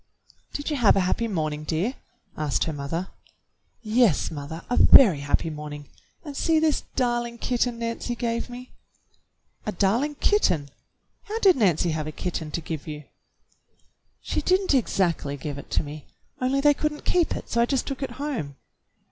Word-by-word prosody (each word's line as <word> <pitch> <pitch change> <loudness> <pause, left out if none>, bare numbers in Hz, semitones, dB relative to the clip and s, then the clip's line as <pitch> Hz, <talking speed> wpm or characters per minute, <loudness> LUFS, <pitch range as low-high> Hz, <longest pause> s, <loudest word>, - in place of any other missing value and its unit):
"Did 290 +2 -3
you 295 - 0
have 235 -5 +5
a 195 - +3
happy 185 +5 0
morning, 155 -6 -2
dear.^" 170 +10 -1 0.4
asked 150 -3 0
her 160 - -2
mother. 150 +6 -4 0.7
"Yes, 220 - +3
mother, 155 +2 -7
a 245 - 0
very 195 - +8
happy 145 +3 0
morning, 150 -1 -8 0.4
and 290 -2 -7
see 325 +3 +2
this 310 -1 +2
darling 240 -2 0
kitten 245 0 0
Nancy 230 +1 -3
gave 235 0 -2
me." 250 +1 -9 1.0
"A - - +1
darling 235 +10 +1
kitten! 180 - +2 0.6
How 435 0 -3
did 390 -5 +5
Nancy 180 - +2
have 155 -1 -3
a - - -3
kitten 165 -1 -4
to 170 - -3
give 160 -1 -6
you?" 150 -1 -6 1.2
"She - - -1
did 370 +1 +3
n't 380 - 0
exactly 175 - +1
give 145 0 -5
it - - -11
to - - +1
me, 150 0 -9 0.3
only 265 +2 +1
they 295 +1 +6
could 300 +2 -1
n't 295 - -12
keep 350 -2 +2
it, - - -6
so 235 - +1
I 235 - +3
just 270 -1 0
took 275 -1 -5
it 270 - -3
home." 260 - -3
220 Hz, 175 wpm, -25 LUFS, -, 1.2 s, very